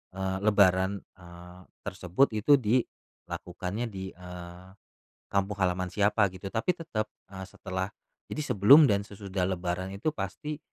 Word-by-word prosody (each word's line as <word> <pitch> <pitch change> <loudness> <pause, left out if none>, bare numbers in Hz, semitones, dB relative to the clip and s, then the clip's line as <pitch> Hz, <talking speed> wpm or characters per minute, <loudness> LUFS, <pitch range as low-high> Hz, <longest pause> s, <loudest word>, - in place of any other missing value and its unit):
eee, 95 0 -2
lebaran, 100 -2 +4 0.2
eee, 90 0 -13 0.2
tersebut 95 +6 +2
gitu 140 +7 +5
dilakukannya 105 -3 -3
di, 95 -3 -6
eee, 90 0 -10 0.6
kampung 100 0 0
halaman 90 0 0
siapa 105 0 +3
gitu. 95 +1 -7
Tapi 130 - 0
tetep, 150 -11 -3 0.2
eee, 95 -1 -7
setelah 95 -1 -4 0.4
jadi 155 - -3
sebelum 135 +10 +8
dan 100 0 +1
sesudah 95 -2 -3
lebaran 95 +1 -3
itu 100 +11 -1
pasti 150 0 -5
95 Hz, 130 wpm, -29 LUFS, 90-105 Hz, 0.6 s, sebelum